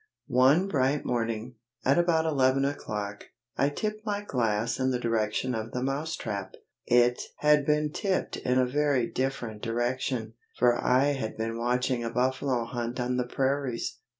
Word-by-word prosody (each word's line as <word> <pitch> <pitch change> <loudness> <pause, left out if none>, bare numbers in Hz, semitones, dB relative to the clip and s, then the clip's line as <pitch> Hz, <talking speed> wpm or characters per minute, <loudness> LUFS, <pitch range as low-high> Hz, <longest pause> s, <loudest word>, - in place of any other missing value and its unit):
ONE 135 +8 +4
bright 140 -4 +1
morning, 115 0 -2 0.3
at 135 +6 +4
about 165 -2 +2
eleven 135 -3 +3
o'clock, 105 -7 -4 0.3
I 140 - +2
tipped 215 +7 -3
my 205 -2 -2
glass 115 - 0
in 130 0 +2
the 125 - +1
direction 115 +1 0
of 110 0 -4
the 125 - -2
Mouse 145 +5 -2
trap. 100 -4 -5 0.3
It 120 0 +4 0.2
had 150 -1 +3
been 150 0 +2
tipped 195 +3 -1
in 125 0 0
a 130 - +4
very 140 -1 +1
different 125 -5 -3
direction, 120 0 -2 0.2
for 120 -1 +3
I 130 +3 +4
had 135 -6 -3
been 115 +1 -2
watching 125 +1 0
a 115 - -2
buffalo 125 0 0
hunt 120 +1 -4
on 125 +1 0
the 125 -1 -1
prairies. 130 -3 -1
125 Hz, 160 wpm, -28 LUFS, 115-140 Hz, 0.3 s, ONE